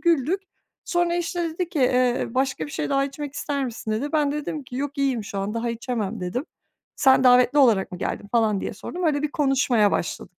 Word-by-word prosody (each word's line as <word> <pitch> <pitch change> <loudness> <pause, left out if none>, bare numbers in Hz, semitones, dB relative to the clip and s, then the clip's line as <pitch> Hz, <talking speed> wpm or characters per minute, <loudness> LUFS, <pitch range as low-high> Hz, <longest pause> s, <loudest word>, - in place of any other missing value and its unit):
Güldük. 340 +2 +2 0.4
Sonra, 345 -1 +1
işte, 345 -1 -2
dedi 340 +2 -3
ki, 315 - -4
"Eee, 250 -1 +2
başka 260 - -1
bir - - -10
şey 150 - -3
daha 275 0 +2
içmek 280 +1 -6
ister 280 -2 -2
misin?" 225 -2 -5
dedi. 270 +8 -2
Ben 295 -2 +2
de - - -2
dedim 300 0 -4
ki, 250 0 -8
"Yok, 285 +1 -4
iyiyim 260 -6 0
şu 200 - -5
an, 200 +3 -3
daha 230 +1 -1
içemem." 230 -4 -3
dedim. 180 +10 -3 0.5
"Sen 265 -2 +5
davetli 250 +3 +5
olarak 215 -9 +4
mı 180 - -6
geldin?" 205 - -4
falan 220 -4 +2
diye - - -4
sordum. 350 - -6
Öyle 295 -2 +1
bir 300 - -1
konuşmaya 260 -8 +2
başladık, 175 +1 -3
265 Hz, 215 wpm, -24 LUFS, 230-295 Hz, 0.5 s, Sen